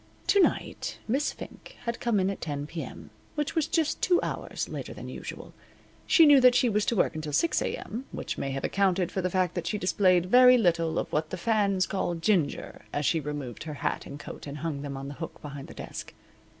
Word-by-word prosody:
To 400 - +4
night 375 - 0
Miss 270 +6 +1
Fink - - -11
had 235 -1 -3
come 235 -4 +1
on 190 +1 +1
at 195 - -7
10 145 -2 -3
P.M., 165 +2 -7 0.2
which 295 -2 -1
was 320 -3 +1
just 320 -3 0
two 355 -1 +4
hours - - -3
later - - -6
than - - -8
usual. - - -8 0.5
She 330 - +7
knew 290 -3 +7
that 250 -1 +7
she 245 - +4
was 210 -1 +1
to 235 - +2
work - - +2
until 155 -2 -5
6 335 - +2
A.M., 240 +5 -4
which - - -4
may 135 - -3
have 135 0 -3
accounted 190 -2 +1
for 190 - -1
the 180 - 0
fact 180 -1 +1
that 170 -2 -3
she 210 - -1
displayed 185 -2 +3
very 250 +5 +7
little 170 -6 +2
of - - -2
what 155 +1 0
the 185 - -4
fans 200 -2 +2
call 175 -3 -1
ginger 165 -3 0
as 145 0 -1
she 165 - +2
removed 145 -3 -5
her 155 -2 -5
hat - - -2
and 140 - -8
coat - - -9
and 140 +1 -6
hung 145 -4 -2
them 140 -1 -5
on 135 0 -6
the 140 - -6
hook - - -6
behind 140 -2 -8
the - - -12
desk. - - -8
185 Hz, 225 wpm, -28 LUFS, 150-230 Hz, 0.5 s, She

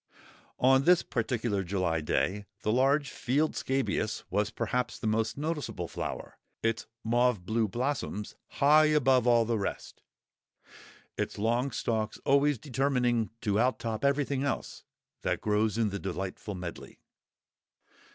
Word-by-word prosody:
On 130 +1 +5
this 180 0 +5
particular 115 -4 -1
July 90 -3 0
day 100 +6 -1 0.2
the 105 - +1
large 140 +4 +2
field 145 +5 0
scabious 130 -5 -1
was 105 0 +1
perhaps 125 -1 -2
the - - -7
most 110 +2 0
noticeable 150 - -3
flower; - - -6 0.2
its 115 0 0 0.2
mauve 120 -4 +2
blue 110 +2 +1
blossoms 120 -2 -3
high 150 +2 +5
above 135 -5 +3
all 120 -1 +5
the 115 -1 0
rest; 100 - -5 1.2
its - - -2
long 120 +5 +1
stalks 110 -3 -2
always 140 0 +4
determining 125 -3 0
to 105 -1 +1
out 125 +2 +2
top 110 -2 -4
everything 140 -1 +1
else 140 - -3 0.4
that - - -1
grows 105 0 +1
in 115 -2 +2
the 100 0 -4
delightful 95 +2 -5
medley. 90 -2 -8
120 Hz, 130 wpm, -29 LUFS, 105-135 Hz, 1.2 s, On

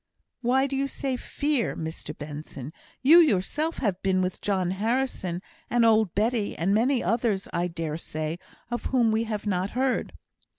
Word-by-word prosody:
"Why 260 +2 +3
do 275 0 -3
you 275 +1 0
say 270 -1 -2
'fear,' 285 0 -1
Mr 160 -1 -6
Benson? 145 -1 -7 0.3
You 315 +6 +9
yourself 300 - +2
have 195 -6 -1
been 185 -1 +2
with 185 0 -3
John 185 -3 0
Harrison, 200 -4 -1 0.3
and 240 0 +3
old 220 -4 +4
Betty, 215 +1 0
and 185 +4 +1
many 245 +4 +2
others, 220 -1 0
I 175 +1 +1
dare 165 -3 -4
say, 155 0 -4 0.3
of 240 - -3
whom 240 -4 +3
we 220 +1 +1
have 215 -2 -4
not 190 -1 0
heard." 260 0 0
210 Hz, 165 wpm, -26 LUFS, 180-250 Hz, 0.3 s, You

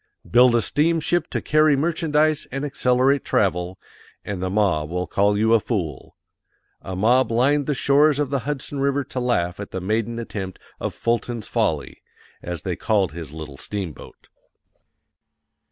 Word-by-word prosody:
_ - - -18
BUILD 125 0 +6
A 120 - +3
STEAMSHIP 165 +5 +1
TO - - -3
CARRY 155 -1 +4
MERCHANDISE 155 0 +1
AND 135 +3 -3
ACCELERATE 130 0 +2
TRAVEL 95 -6 0 0.5
and 95 -3 -4
the 95 - -1
mob 90 -7 +1
will 90 +1 -2
call 100 +4 +1
you 110 +2 +3
a 115 - +6
fool. 90 - -4 0.7
A 95 - -6
MOB 120 +6 +3
LINED 135 +5 +2
THE 150 - 0
SHORES 145 +2 +4
OF 145 -2 -1
THE 140 - +1
HUDSON 140 +2 -4
RIVER 140 +1 +1
TO 130 0 -5
LAUGH 95 -8 0
AT 100 - -6
THE 95 - -4
MAIDEN 110 +4 -1
ATTEMPT 100 -5 -5 0.2
OF - - -4
"FULTON'S 115 -1 -2
FOLLY," - - -1 0.4
_as 85 -3 -5
they - - -2
called 100 -6 +1
his 80 -3 -8
little 75 -3 -8
steamboat. 95 -7 -7
115 Hz, 160 wpm, -22 LUFS, 95-140 Hz, 0.7 s, BUILD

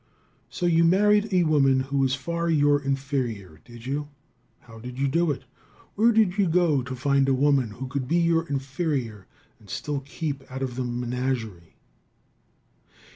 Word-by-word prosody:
So 180 - -4
you 170 -1 +4
married 210 +5 +4
a 180 -2 +3
woman 140 -4 +3
who 140 +1 -2
was 135 -1 +2
far 170 +4 -3
your 145 -2 +3
inferior, 130 - -3
did 120 -1 -13
you? 145 +2 -3 0.5
How 115 -1 -14
did 125 +2 -8
you 140 +1 +1
do 165 +4 +1
it? 145 - -3 0.5
Where 230 +3 +4
did 215 -3 +2
you 195 - +3
go 165 -4 +2
to 125 +1 -6
find 140 +1 +2
a 135 - +3
woman 135 -3 +2
who 125 +5 -7
could 130 -1 -3
be 165 +5 +1
your 165 -1 +2
inferior 135 - -3 0.3
and - - -19
still 145 -1 -3
keep 140 0 -5
out 135 +1 -4
of 125 -2 -4
the 130 - -2
menagerie? 120 -6 -3
140 Hz, 170 wpm, -25 LUFS, 125-165 Hz, 0.5 s, you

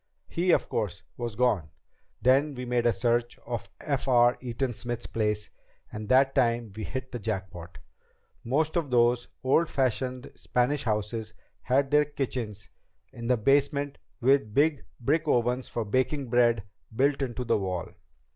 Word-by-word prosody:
He, 175 +2 -1
of - - +4
course, 90 -8 -3
was 120 -3 -4
gone. 105 -11 +1 0.5
Then 135 +4 +4
we 125 0 -5
made 120 -1 +1
a - - +5
search 120 0 0
of 120 -1 -4
F. 140 -2 -2
R. 120 -1 +5
Eaton 125 +1 -2
Smith's 120 +1 -4
place, 105 -1 -2 0.4
and 105 0 -6
that 135 +1 +5
time 115 -2 +1
we 110 -1 -4
hit 130 -1 -5
the 120 - -4
jackpot. 95 -6 -5 0.7
Most 150 +6 0
of 165 -5 0
those 120 0 +3 0.2
old 155 +5 +3
fashioned 130 -1 -1
Spanish 130 +3 0
houses 110 0 -2 0.3
had 135 +2 +1
their 150 0 +5
kitchens 125 -8 -4 0.5
in 115 0 -6
the 125 0 +3
basement 140 +4 +1 0.2
with 125 -4 +2
big 150 0 +3 0.2
brick 155 +6 +1
ovens 125 -1 +1
for 115 - -3
baking 130 +3 0
bread 120 -3 +3 0.3
built 140 +3 +2
into 125 -2 -2
the 120 - +1
wall. 95 -3 -3
125 Hz, 155 wpm, -28 LUFS, 115-135 Hz, 0.7 s, a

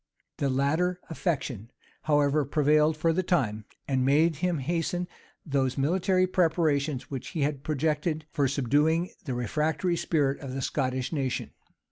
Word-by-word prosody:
The 140 - 0
latter 155 +7 +1
affection, 135 - -2 0.3
however, 145 -1 +2
prevailed 150 +2 +3
for 165 +1 +2
the 185 - +1
time, 115 - 0 0.2
and 130 -2 +1
made 150 +4 +3
him 175 +1 0
hasten 170 +4 -1 0.4
those 135 -4 0
military 185 +6 +2
preparations 160 -7 +1
which 135 -3 -5
he 165 - -4
had 140 -1 -1
projected 155 +1 -1
for 145 -4 +1
subduing 150 +6 +1
the 130 -4 -3
refractory 155 - 0
spirit 150 -5 0
of 135 -2 -6
the 135 - -3
Scottish 130 0 -1
nation. 135 -4 -2
150 Hz, 140 wpm, -28 LUFS, 135-165 Hz, 0.4 s, prevailed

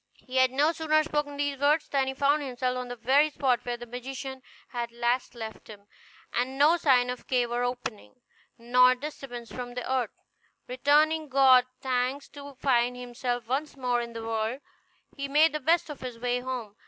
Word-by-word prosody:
He 255 0 -4
had 260 0 +5
no 285 +5 +2
sooner 310 -1 +2
spoken 295 -2 -2
these 285 -1 -1
words 295 +3 +2
than 270 -2 0
he 265 - -3
found 285 +2 +2
himself 255 -2 -2
on 250 0 -4
the 245 - -6
very 265 +6 +3
spot 255 -4 0
where 240 -1 -3
the 240 - -8
magician 260 +2 -7 0.3
had 235 -1 -4
last 240 +1 -1
left 220 -2 -8
him, 205 -2 -13 0.5
and 255 +2 -1
no 300 +4 +6
sign 250 -6 +3
of 250 - -8
cave 245 -2 +1
or 240 0 0
opening, 245 -3 -5 0.4
nor 250 +2 +5
disturbance 250 -4 -8
of 245 -1 -6
the 250 - -4
earth. 255 -4 0 0.6
Returning 300 +4 +2
God 260 -2 +6
thanks 260 +2 -1
to 285 -1 -11
find 250 -2 +1
himself 245 0 -3
once 280 +4 -2
more 245 -2 0
in 235 0 -7
the 230 0 -6
world, 225 +4 -2 0.5
he 280 -1 -4
made 300 +3 +4
the 305 - -1
best 330 +5 +2
of 295 -3 -8
his 250 -2 -6
way 245 +1 -1
home. 245 -5 -5
255 Hz, 190 wpm, -28 LUFS, 245-280 Hz, 0.6 s, no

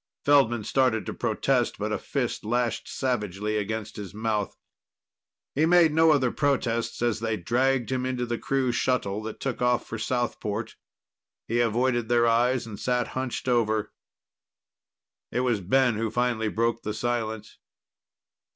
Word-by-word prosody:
Feldman 125 -6 +4
started 125 -2 +1
to - - -4
protest, - - 0
but - - -3
a - - -1
fist - - -2
lashed 120 +1 -1
savagely 105 -5 -2
against 105 +1 -4
his 100 -1 -7
mouth. 110 -2 -2 1.0
He 155 +3 +2
made 170 -2 +5
no 160 +1 +5
other 135 -5 +3
protests 120 -5 0
as 120 -2 +1
they 110 -1 -1
dragged 125 +6 +1
him 130 -1 0
into 125 -1 -1
the 120 -1 -3
crew 135 -2 0
shuttle 115 -4 0
that 110 0 -7
took 135 -2 -3
off 125 0 +2
for 115 - -6
Southport. 115 -2 -2 0.7
He 120 +1 0
avoided 120 0 +1
their 120 -1 +4
eyes 120 +2 +2
and 105 -3 -8
sat 125 -1 0
hunched 130 -1 -4
over. 110 -3 +1 1.4
It 125 - 0
was 120 -5 +1
Ben 120 +4 +2
who 115 0 -1
finally 120 -1 0
broke 115 +1 0
the 105 0 -4
silence. 110 -2 -3
120 Hz, 150 wpm, -26 LUFS, 110-125 Hz, 1.4 s, made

